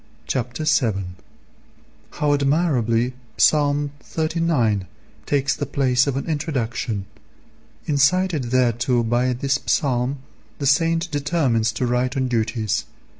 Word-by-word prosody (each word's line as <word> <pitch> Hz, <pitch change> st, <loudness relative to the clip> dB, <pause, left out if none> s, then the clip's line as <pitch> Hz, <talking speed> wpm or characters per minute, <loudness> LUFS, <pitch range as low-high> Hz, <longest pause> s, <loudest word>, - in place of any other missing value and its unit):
Chapter 125 Hz, +3 st, -3 dB
VII. 110 Hz, -11 st, +1 dB, 1.0 s
How 145 Hz, -1 st, 0 dB
admirably 135 Hz, -5 st, +1 dB, 0.2 s
Ps. -, -, +6 dB
xxxix. 145 Hz, -1 st, 0 dB
[xxxviii.] 155 Hz, -, 0 dB, 0.4 s
takes 140 Hz, -1 st, +1 dB
the 145 Hz, -, -4 dB
place 130 Hz, -2 st, +2 dB
of 135 Hz, -1 st, -1 dB
an 140 Hz, -, -3 dB
introduction. 125 Hz, -, -2 dB, 0.8 s
Incited 155 Hz, +1 st, +2 dB
thereto 120 Hz, -1 st, +2 dB
by 120 Hz, +2 st, +1 dB
this 135 Hz, +3 st, 0 dB
psalm 130 Hz, -1 st, +1 dB, 0.4 s
the 140 Hz, -, -4 dB
saint 165 Hz, +4 st, +2 dB
determines 140 Hz, -7 st, +1 dB
to 125 Hz, -, -1 dB
write 125 Hz, +2 st, 0 dB
on 130 Hz, -1 st, +1 dB
duties. 110 Hz, -3 st, -1 dB
135 Hz, 115 wpm, -22 LUFS, 120-145 Hz, 1.0 s, Ps